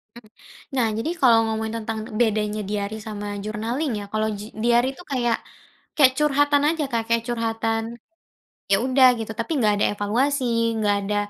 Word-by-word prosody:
Mmm, 235 -2 -14 0.5
nah 245 -4 +2
jadi 310 +9 -2
kalau 235 -4 +6
ngomongin 220 0 -3
tentang 220 0 -4 0.2
bedanya 215 -2 +1
diary 205 +1 -3
sama 205 -1 -5 0.2
journaling 230 +7 -2
ya, - - -6
kalau 215 0 0
ji - - -7 0.2
diary 240 +1 +3
itu 355 - -12
kayak 240 -3 +1 0.6
kayak 270 -4 +6
curhatan 290 -1 +3
aja 320 -2 -1
Kak, 230 -1 +1
kayak 230 0 +2
curhatan, 225 -1 -1 0.9
ya - - +7
udah 260 0 +6
gitu 225 0 -4
tapi 230 - -3
enggak 210 -3 +3
ada 205 - +1
evaluasi, 255 +7 0 0.3
enggak 205 -2 +1
ada 205 +1 -2
225 Hz, 165 wpm, -23 LUFS, 215-255 Hz, 0.9 s, ya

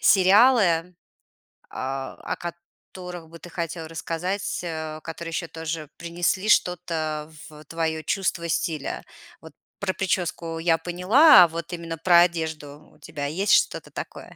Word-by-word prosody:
сериалы, 190 -3 +5 0.8
а, 135 0 -4
о - - -3
которых 175 0 -10
бы 165 +1 -12
ты 175 - -11
хотел 165 -1 -5
рассказать, 170 +5 -3
э, 160 -2 -5
которые 165 +1 -6
еще 165 +1 -3
тоже 160 -2 -5
принесли 175 +4 -1
что-то 160 -5 0 0.2
в 150 0 -13
твое 160 0 -2
чувство 170 -2 -1
стиля? 155 -3 -2 0.4
Вот - - -13 0.3
про 190 -1 -1
прическу 170 -3 -2
я 165 0 +3
поняла, 180 - +6
а - - -1
вот 170 +2 -6
именно 165 -1 -5
про 170 +1 +5
одежду 160 -4 -2
у - - -24
тебя 145 -1 -6
есть 190 +8 +1
что-то - - +2
такое? - - -8
170 Hz, 140 wpm, -24 LUFS, 160-180 Hz, 0.8 s, поняла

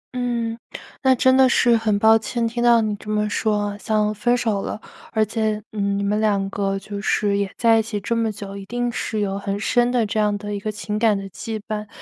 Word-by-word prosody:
嗯， 235 -2 -2 0.4
那 260 -1 +4
真 260 +2 +4
的 265 -1 +6
是 240 -1 +4
很 220 -2 +1
抱 220 +2 +5
歉 230 +1 -2
听 240 +1 -2
到 235 -1 +5
你 210 -1 -1
这 210 - -11
么 210 0 +1
说 205 -2 0
像 210 +1 0
分 240 +4 +1
手 220 -5 0
了。 - - -5 0.3
而 220 -1 +2
且， 215 -1 -1
嗯， 200 -2 -1
你 200 - -1
们 210 +1 0
2 200 -2 +1
个 195 -1 -1
就 200 +1 -6
是 205 -1 +1
也 200 -2 -2
在 230 -1 +4
一 - - +3
起 215 -1 -4
这 230 +3 -2
么 225 -1 0
久 200 -1 -8
一 200 - -7
定 245 0 -2
是 220 -2 -3
有 200 -1 -2
很 200 0 -3
深 240 +2 +2
的 245 -3 +2
这 215 +1 -2
样 210 -1 +1
的 205 0 -6
一 200 - -3
个 215 +1 -3
情 210 0 -4
感 220 -3 +3
的 195 - -5
羁 220 +3 -5
绊。 210 -1 -4
215 Hz, 250 characters per minute, -22 LUFS, 205-230 Hz, 0.4 s, 的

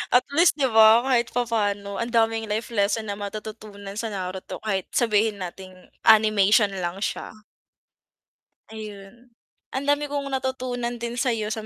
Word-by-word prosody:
at 250 - +6
least 335 +4 +4
'di 270 -5 0
ba, 220 +2 +7
kahit 245 -3 +2
papano 205 -4 -1
ang 235 +1 -2
daming 225 -1 +1
life 220 +4 -3
lesson 210 0 0
na 200 - -6
matututunan 205 -1 -8
sa 225 - -2
Naruto 190 -2 -6
kahit 195 -4 -2
sabihin 215 -3 +1
nating 185 +1 -9 0.3
animation 215 -1 +5
lang 180 +3 -3
siya. - - -4 1.4
Ayun. 215 +2 -11 0.4
Ang 265 +2 -3
dami 290 0 +2
kong 280 -1 -3
natutunan 255 -2 -2
din 235 +1 -4
sa'yo 230 -5 0
sa 220 0 -4
220 Hz, 145 wpm, -24 LUFS, 200-240 Hz, 1.4 s, ba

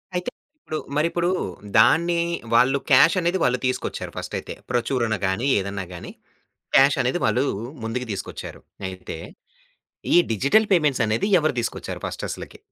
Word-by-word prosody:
అయితే 180 +6 -1 0.3
ఇప్పుడు, 155 - -5 0.2
మరి 150 +2 +3
ఇప్పుడు 175 0 0 0.5
దాన్ని 170 +9 +4 0.3
వాళ్ళు 130 +4 +5
క్యాష్ 160 +8 +7
అనేది 175 +2 +1
వాళ్ళు 125 0 +2
తీసుకొచ్చారు 130 - -2
ఫస్టయితే. - - -5 0.2
ప్రచురణ 120 -2 0
గాని, 100 +8 -1
ఏదైనా 100 0 -4
గాని 85 - -8 0.7
క్యాషనేది 135 +2 +4
వాళ్ళు 125 - +2 0.4
ముందుకు 125 +2 -3
తీసుకొచ్చారు. 95 - -7 0.3
అయితే, 95 -3 -7 1.0
ఈ - - +8 0.2
డిజిటల్ 140 - +3
పేమెంట్సనేది 135 - +2
ఎవరు 155 -4 0
తీసుకొచ్చారు 115 - -5
ఫస్ట్ - - -5
అసలకి? - - -8
130 Hz, 125 wpm, -23 LUFS, 115-165 Hz, 1.0 s, ఈ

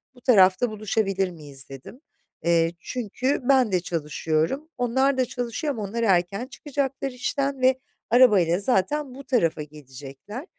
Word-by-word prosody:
bu 245 - -18
tarafta 200 -1 +4
buluşabilir 205 -3 -1
miyiz, 145 -5 -7
dedim. 135 - -11 0.4
Eee, 165 -1 +3
çünkü 250 +5 -2
ben 260 -5 +4
de 185 - +2
çalışıyorum, 165 - -2
onlar 265 +3 +1
da 255 - +2
çalışıyor 245 +5 -3
ama 220 -5 -5
onlar 225 +4 -3
erken 195 +3 +1
çıkacaklar 275 -1 -3
işten 275 +2 -2
ve 260 0 +3 0.3
arabayla 205 -8 +5
zaten 255 +6 0
bu 275 - -9
tarafa 165 - 0
gelecekler. 145 - -10
220 Hz, 135 wpm, -24 LUFS, 170-260 Hz, 0.4 s, arabayla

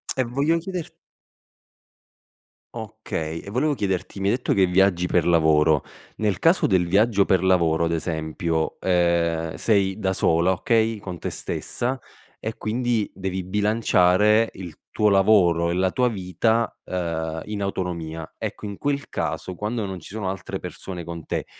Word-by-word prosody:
E 130 - +2
voglio 140 +7 +1
chieder 180 -1 -5 1.9
Okay, 80 +1 -5
e - - -10
volevo 140 +8 +1
chiederti: 95 -3 -2
mi 95 - 0
hai 105 - +3
detto 125 - -1
che 95 - +4
viaggi 90 -1 +3
per 90 -2 +2
lavoro, 80 -3 +3 0.3
nel 105 -4 0
caso 165 +3 +3
del 95 -3 +2
viaggio 100 +3 +3
per 95 -2 +2
lavoro, 85 -3 +3
ad 85 - -1
esempio, 80 0 -2
ehm, 85 -2 +1
sei 100 -3 +1
da 95 -3 0
sola, 85 -1 +2
okay, 110 +3 +1
con 90 -3 -7
te - - -4
stessa 125 +2 -3 0.4
e 110 0 -4
quindi 115 0 -1
devi 95 0 -3
bilanciare 105 +1 +3
il 90 -4 -8 0.2
tuo 105 - +2
lavoro 95 -4 +4
e 85 - -1
la 95 0 +1
tua 125 +3 +2
vita, 110 +3 0
uhm, 80 -3 -3
in 105 -1 -4
autonomia. 85 -5 -4
Ecco, - - -5
in 100 -1 -6
quel 140 0 -2
caso 80 +3 -3
quando 105 +4 -3
non 95 -2 -5
ci 85 - -11
sono 105 -4 -3
altre 95 0 -5
persone 90 -3 -7
con 85 -1 -7
te, - - -3
95 Hz, 155 wpm, -23 LUFS, 85-110 Hz, 1.9 s, che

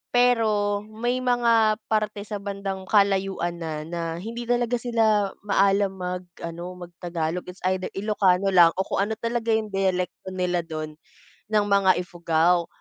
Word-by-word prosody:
Pero 215 -4 +3
may 240 +4 -2
mga 235 -3 +3 0.2
parte 210 -1 0
sa 210 -1 -5
bandang 195 -1 -5
kalayuan 195 -4 +1
na 155 -2 -4
na 170 +1 -4 0.2
hindi 230 +5 -6
talaga 245 0 +1
sila 220 -4 +2
maalam 195 0 +3
mag-ano 180 -1 -6
mag - - -25
Tagalog. 170 0 -2
It's 185 - -18
either 185 0 -2
ilocano 195 -2 +2
lang 175 -3 +6
o - - +3
kung 195 - +1
ano 220 - -3
talaga 230 -1 -1
yung 220 -1 +1
diyalekto 190 -1 -1
nila 180 -2 0
dun, 155 -1 -6 0.6
ng 210 -1 +3
mga 195 -2 +5
Ifugao. 170 0 +1
195 Hz, 145 wpm, -25 LUFS, 180-215 Hz, 0.6 s, lang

